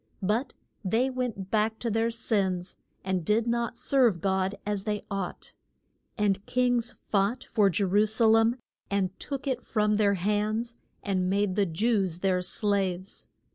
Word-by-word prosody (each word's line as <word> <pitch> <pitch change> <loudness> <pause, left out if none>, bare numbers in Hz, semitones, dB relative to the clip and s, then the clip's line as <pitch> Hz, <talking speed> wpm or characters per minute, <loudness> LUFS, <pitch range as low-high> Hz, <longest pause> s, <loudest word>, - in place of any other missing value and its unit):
But 215 +8 0 0.3
they 230 +7 +1
went 240 -7 -4
back 220 0 +1
to 230 0 -2
their 225 +2 +1
sins, 195 -5 -1 0.3
and 185 -2 -1
did 215 +6 +2
not 235 -1 -1
serve 245 -10 +3
God 190 +1 0
as 205 -2 -1
they 210 -1 -2
ought. 195 -2 -5 0.6
And 200 -2 +1
kings 245 -1 +2
fought 210 +5 -1
for 210 -4 +2
Je 195 +3 0
ru 205 +3 +3
sa 220 +2 +1
lem 225 +1 +5 0.3
and 195 -2 0
took 275 -1 -4
it 255 -3 -1
from 210 -1 +1
their 200 -2 +3
hands 210 +5 -1 0.3
and 185 -3 0
made 200 -1 +1
the 200 -2 +2
Jews 190 -1 0
their 185 -2 +2
slaves. 190 -1 -2
210 Hz, 155 wpm, -28 LUFS, 190-230 Hz, 0.6 s, lem